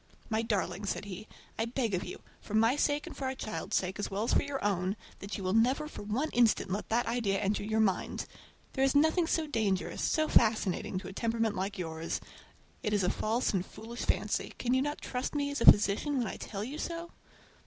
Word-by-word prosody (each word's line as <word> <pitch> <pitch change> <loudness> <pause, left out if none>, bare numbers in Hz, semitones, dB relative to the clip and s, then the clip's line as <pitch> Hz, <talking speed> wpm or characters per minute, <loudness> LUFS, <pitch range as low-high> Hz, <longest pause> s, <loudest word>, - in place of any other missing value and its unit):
"My 220 0 +2
darling," 205 -2 -1
said 200 - -2
he, 200 +1 -7 0.3
"I 225 - +2
beg 235 -2 -1
of 180 - 0
you, - - -8 0.2
for 210 - -5
my 225 +4 +4
sake 290 0 +1
and - - -8
for 270 - -4
our 260 0 -1
child's 215 -4 -4
sake, 190 +2 0
as 205 - -2
well 200 +2 -1
as 235 - +1
for - - +5
your 280 -1 -4
own, 190 -1 +1 0.2
that 200 +1 -5
you 195 - -6
will 185 0 0
never 250 +7 +3
for - - -8
one 230 +10 -1
instant 230 -5 +3
let 200 +3 -3
that 235 +2 +2
idea 225 -4 0
enter 205 +1 0
your 220 +1 +1
mind! 195 -4 0 0.5
There 265 - +1
is 270 +1 +3
nothing 320 +3 +4
so 320 -1 +1
dangerous, 195 - -1
so 310 0 +2
fascinating, 205 - +2
to 185 0 -5
a 190 - -7
temperament 225 0 0
like 195 +2 -2
yours. 160 -2 -3 0.6
It 210 - -1
is 205 -2 +2
a 180 - +3
false 225 +3 0
and 185 -2 +1
foolish 225 +5 -9
fancy. - - -1
Can 245 0 0
you 260 - +3
not 290 +2 -2
trust 250 +3 -3
me 285 -1 0
as 285 - -3
a - - +2
physician 210 +8 0
when 245 - +1
I - - -4
tell 200 -1 -5
you 275 +7 -5
so?" 335 0 -4
220 Hz, 230 wpm, -31 LUFS, 200-265 Hz, 0.6 s, for